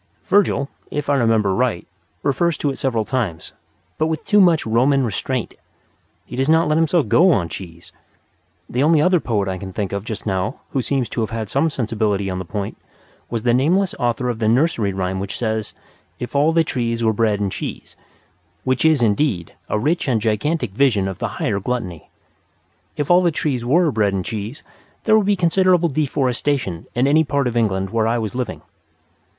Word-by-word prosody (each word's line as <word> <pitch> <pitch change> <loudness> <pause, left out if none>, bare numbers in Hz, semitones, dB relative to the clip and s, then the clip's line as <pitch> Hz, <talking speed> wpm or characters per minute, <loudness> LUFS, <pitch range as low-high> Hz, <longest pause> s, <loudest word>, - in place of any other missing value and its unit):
Virgil, 185 -8 +2 0.2
if 145 0 -2
I - - +3
remember 115 -6 +2
right, 120 -5 0 0.4
refers 160 +3 +1
to 145 - 0
it 135 - -7
several 115 -5 0
times, 105 -12 -3 0.5
but 155 - +2
with 160 -1 -3
too 205 -1 +4
much 170 -4 +4
Roman 130 +4 +2
restraint. 120 +3 -3 0.7
He - - -8
does 135 +3 0
not 160 +1 +4
let 155 +1 +2
himself 165 -4 +2
go 175 - +5
on 90 - +1
cheese. 85 -1 -9 0.8
The 125 - -1
only 155 +2 +4
other 180 +3 +4
poet 105 -8 -1
I 95 -1 -3
can 95 -2 -7
think 100 0 -3
of 100 -1 -3
just 110 -1 -6
now 95 +5 -2
who 135 - 0
seems 130 -1 -1
to 120 - -2
have 110 - -1
had 110 -3 -4
some 145 +4 +2
sensibility 105 -7 -1
on 90 - -3
the 95 - -5
point 100 +3 -5 0.5
was 115 -2 -3
the 120 -1 +3
nameless 175 +9 +2
author 120 +1 0
of 120 -2 -2
the 110 - +1
nursery 115 -4 +2
rhyme 95 0 -2
which 100 +1 -4
says: 110 -2 -2 0.4
"If 125 - -7
all 145 +3 +4
the 165 0 +3
trees 115 -5 -2
were 110 -1 +3
bread 105 -1 +1
and 100 -2 -1
cheese" - - -6 0.7
which 130 -1 0
is, 155 -5 +4
indeed 105 - 0 0.2
a - - +1
rich 150 +11 0
and 120 -4 +2
gigantic 115 - -1
vision 105 -4 +2
of 95 -2 -5
the - - -1
higher 100 - -1
gluttony. 95 -7 -4 0.9
If 145 +2 -1
all 175 +1 +6
the 175 - +3
trees 145 -6 -2
were 155 +6 +3
bread 105 -4 +1
and 95 -2 -2
cheese 110 +6 -5 0.4
there 220 - +4
would 210 -2 +3
be 205 - +3
considerable 180 -1 +3
deforestation 135 - -1
in 120 +2 +2
any 150 +3 +4
part 140 -2 0
of 120 -1 -2
England 95 -4 0
where 110 -1 +1
I 115 +1 +1
was 110 -3 -3
living. 125 -2 -4
120 Hz, 195 wpm, -20 LUFS, 105-150 Hz, 0.9 s, all